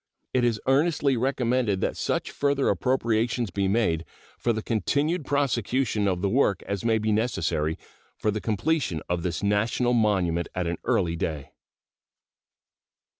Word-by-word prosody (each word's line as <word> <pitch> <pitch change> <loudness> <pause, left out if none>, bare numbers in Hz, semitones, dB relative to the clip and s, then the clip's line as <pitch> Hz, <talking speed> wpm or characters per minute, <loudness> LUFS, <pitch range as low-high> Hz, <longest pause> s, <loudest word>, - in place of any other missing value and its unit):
It 125 - +2
is 115 -3 +1
earnestly 140 0 +2
recommended 125 -4 +1
that - - 0
such - - -2
further 140 -1 +1
appropriations 115 -3 0
be 100 -1 0
made 95 -6 +1 0.4
for 120 - +1
the 110 -1 -2
continued 145 - 0
prosecution 125 -5 0
of 90 -1 -1
the - - +3
work 100 -4 +2
as 100 +1 -4
may 115 -1 +3
be 110 0 0
necessary 85 -8 0 0.4
for 105 - 0
the 105 0 -3
completion 110 - -1
of 90 0 -1
this 90 +3 -3
national 110 +4 +1
monument 95 -7 +1
at 90 -1 -1
an 85 0 -2
early 85 -1 +1
day. 75 -4 -4
110 Hz, 145 wpm, -26 LUFS, 95-130 Hz, 0.4 s, the